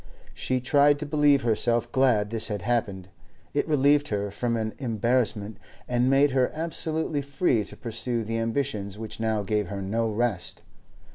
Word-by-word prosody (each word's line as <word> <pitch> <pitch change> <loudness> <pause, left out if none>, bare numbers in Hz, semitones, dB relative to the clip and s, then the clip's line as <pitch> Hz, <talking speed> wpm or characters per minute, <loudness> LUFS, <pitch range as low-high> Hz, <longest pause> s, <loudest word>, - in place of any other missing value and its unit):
She 130 0 -1
tried 145 +3 +4
to 150 - -5
believe 145 -2 +3
herself 115 0 +1
glad 115 -6 +2
this 115 -1 +1
had 105 -4 -4
happened; 100 -6 -1 0.4
it 145 - 0
relieved 145 -1 +3
her 100 -1 -2
from 115 +3 -1
an 110 -1 -3
embarrassment, 115 -3 0 0.3
and 125 +1 +1
made 140 +1 +4
her 130 -1 +2
absolutely 160 -2 0
free 140 - 0
to - - -7
pursue 115 0 -2
the 115 +1 -3
ambitions 110 -4 -2
which 110 0 -6
now 110 -2 0
gave 105 0 -1
her 100 +2 -5
no 110 +4 -1
rest. 110 -4 -2
115 Hz, 160 wpm, -26 LUFS, 105-140 Hz, 0.4 s, tried